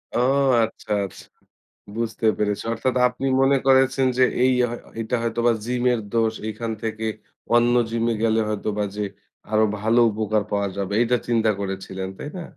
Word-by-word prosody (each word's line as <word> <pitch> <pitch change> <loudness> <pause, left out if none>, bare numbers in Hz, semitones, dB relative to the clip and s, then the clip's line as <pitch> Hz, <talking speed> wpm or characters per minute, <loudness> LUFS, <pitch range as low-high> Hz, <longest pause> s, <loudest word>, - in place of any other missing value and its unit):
ও - - +2 0.4
আচ্ছা 110 -1 -6
আস 95 - -11 0.8
বুঝতে 115 0 -3
পেরেছি। 105 -1 -1
অর্থাৎ 125 +3 -1
আপনি 125 +2 -5 0.2
মনে 135 +1 +4
করেছেন 130 0 +4
যে 130 - +5 0.2
এই 130 - +4
হ 120 -1 +1
হয়তো 120 - -8
এইটা 115 +2 -1
হয়তো 115 0 -2
বা 120 - +6
জিমের 125 0 +1
দোষ 115 -1 +2 0.2
এখান 115 +2 -4
থেকে 110 0 -3 0.5
অন্য 120 0 +4 0.2
জিমে 115 0 0
গেলে 110 0 +2
হয়তো 105 0 -3
বা 105 - +1
যে 105 - -2 0.5
আরোও 110 0 +4
ভালো 115 +3 +2
উপকার 110 0 0
পাওয়া 100 -1 0
যাবে। 100 0 -3
এটা 125 +1 +2
চিন্তা 115 -2 +2
করেছিলেন, 95 -1 -4
তাই 145 - -6
না? - - -5
115 Hz, 170 wpm, -23 LUFS, 105-120 Hz, 0.8 s, বা